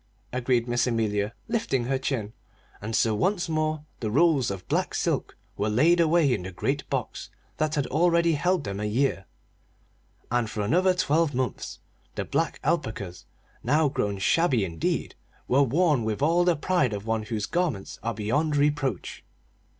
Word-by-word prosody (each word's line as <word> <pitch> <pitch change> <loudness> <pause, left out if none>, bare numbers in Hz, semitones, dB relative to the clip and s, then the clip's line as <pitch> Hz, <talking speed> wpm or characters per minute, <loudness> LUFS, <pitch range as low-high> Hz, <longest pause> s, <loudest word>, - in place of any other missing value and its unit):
agreed 125 -1 +1
Miss 120 +1 +1
Amelia, 110 -2 0
lifting 215 - 0
her 130 +2 -1
chin. 115 -6 -3 0.5
And 110 +2 -3
so 110 +1 +3
once 180 - 0
more 155 -1 -1
the 110 - -2
rolls 140 0 +3
of 95 -2 -6
black - - 0
silk - - -1 0.2
were 105 - 0
laid 160 +11 +4
away 165 -4 +4
in 105 - -1
the 95 +1 -6
great 95 - -2
box - - -3 0.3
that 155 0 0
had 145 -2 0
already 170 +2 +3
held 175 +2 +1
them 100 0 -4
a 105 - -2
year; 110 -2 0 1.1
and 120 -2 +1
for 105 - -3
another 180 - +3
twelve 160 -3 +1
months 130 0 -3 0.3
the - - -3
black - - -1
alpacas, 90 -3 -2 0.4
now 150 +4 +3
grown 105 -7 -1
shabby 130 - +2
indeed, 80 -3 -2 0.3
were 130 +3 +4
worn 145 0 +2
with 110 +4 -2
all 170 +3 +3
the 175 -2 +3
pride 150 -7 +1
of 100 0 -5
one 115 -1 0
whose 110 -1 -3
garments 170 - -2
are 115 0 -2
beyond 145 +9 0
reproach. 145 - -1
130 Hz, 165 wpm, -26 LUFS, 110-160 Hz, 1.1 s, laid